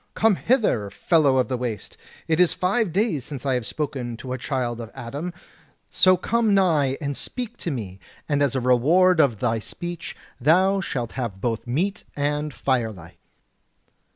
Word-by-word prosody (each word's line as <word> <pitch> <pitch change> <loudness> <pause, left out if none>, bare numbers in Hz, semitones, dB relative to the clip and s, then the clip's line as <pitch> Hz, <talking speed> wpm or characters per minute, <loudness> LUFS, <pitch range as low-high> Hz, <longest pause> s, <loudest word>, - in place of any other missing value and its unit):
Come 220 -2 +4
hither, 215 - +1
fellow 140 - +2
of 130 - +2
the 130 -2 -2
waste; 115 -5 -4 0.3
it 160 0 +1
is 180 -2 +5
five 195 +2 +1
days 185 - 0
since 140 -1 -7
I 135 - +2
have 125 -4 -1
spoken 130 -6 -4
to 125 +1 -6
a - - -2
child 120 -3 -2
of 115 - -7
Adam; 140 +7 -5 0.6
so 185 -1 +5
come 225 +2 +1
nigh 155 -8 +2
and 145 -2 -3
speak 245 - -5
to - - -4
me, 100 - -5 0.3
and 145 -2 +1
as 140 -2 +2
a - - +2
reward 160 +9 +4
of 120 -9 +3
thy 115 0 +1
speech 175 +9 -7 0.2
thou 185 +8 +4
shalt 120 -9 -3
have 115 -7 -4
both 115 +2 -2
meat 185 +11 -1
and 145 +1 -1
firelight." 110 - -2
140 Hz, 170 wpm, -24 LUFS, 120-180 Hz, 0.6 s, is